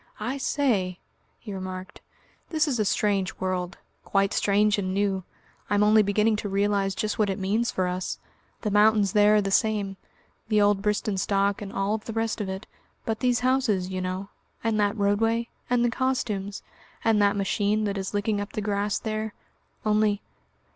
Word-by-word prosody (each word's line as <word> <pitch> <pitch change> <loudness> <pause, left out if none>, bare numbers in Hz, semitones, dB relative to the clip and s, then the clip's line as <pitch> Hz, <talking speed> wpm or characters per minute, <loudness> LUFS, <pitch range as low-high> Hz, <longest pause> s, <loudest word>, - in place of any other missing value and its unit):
"I 250 +6 -3
say," 210 -11 0 0.4
he 210 - -8
remarked; 185 +1 -7 0.5
"this 315 -3 +1
is 255 -5 0
a 215 - +2
strange 195 -1 +1
world 185 0 -3 0.3
quite 195 0 +1
strange 205 +1 +3
and 185 -1 -2
new. 195 -2 0 0.5
I'm 205 0 +3
only 215 +1 +6
beginning 210 +2 +2
to 210 - -4
realise 200 0 +1
just 215 +2 -2
what 210 -2 +3
it 195 - -1
means 215 +5 0
for 185 - 0
us. 180 0 -3 0.4
The 210 - -1
mountains 210 -1 +4
there 210 0 +5
are 210 - +4
the 195 - -2
same, 205 -2 +1 0.5
the 215 -1 +3
old 205 -1 +3
Bristenstock 200 0 0
and 200 -1 -6
all 200 +3 0
the 220 +1 -7
rest 225 0 -1
of 195 - -3
it; 190 +1 -5 0.4
but 220 -1 -2
these 245 -2 +2
houses, 245 -8 +1
you 185 0 -2
know, 185 +2 -4 0.3
and 225 -2 +1
that 205 +1 +1
roadway, 225 +3 +1 0.2
and 240 -1 +3
the 240 - +1
costumes, 220 -6 -2 0.4
and 220 -2 +4
that 200 0 +3
machine 205 +2 +1
that 200 -1 -1
is 190 -1 -3
licking 205 0 0
up 205 - -7
the - - -2
grass 205 0 0
there 215 -1 -3 0.5
only...." 210 -1 +2
205 Hz, 175 wpm, -26 LUFS, 195-220 Hz, 0.5 s, only